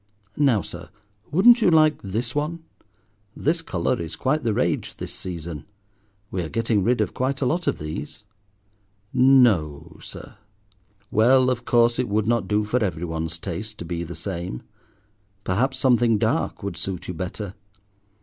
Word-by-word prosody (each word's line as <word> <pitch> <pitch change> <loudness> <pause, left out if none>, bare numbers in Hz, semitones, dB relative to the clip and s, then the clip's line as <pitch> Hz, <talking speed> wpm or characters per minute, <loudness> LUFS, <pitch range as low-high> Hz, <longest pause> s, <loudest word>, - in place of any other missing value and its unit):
Now, 130 -9 +3
sir, 85 0 -9 0.4
wouldn't 235 +9 +6
you 185 - +5
like 155 -2 +4
this 115 +5 -3
one? 155 +3 -2 0.7
This 165 +4 0
colour 85 - -1
is 80 -1 -5
quite 150 +4 0
the 115 - 0
rage - - -1
this - - -6
season; 85 -4 -6 0.7
we 95 - -2
are 80 - -4
getting 115 -3 +1
rid 125 +4 +2
of - - -1
quite 135 +2 -1
a 140 - 0
lot 170 +7 0
of - - +1
these." 75 +6 -6 0.9
"No, 120 - +3
sir! - - -10 0.7
Well, 130 +4 +5
of 120 -1 -3
course, 120 0 +3
it 125 - 0
would 105 +1 +1
not 115 0 +1
do 105 0 +1
for 120 +3 0
every 90 -4 -2
one's 80 0 -3
taste 105 +5 -6
to - - -7
be 85 0 -3
the 85 0 -7
same. 85 -5 -5 0.8
Perhaps 130 +8 0
something 120 -4 +3
dark - - -1
would 100 -4 -4
suit 90 +1 -4
you 90 - -3
better. 95 +3 -5
110 Hz, 160 wpm, -24 LUFS, 85-130 Hz, 0.9 s, wouldn't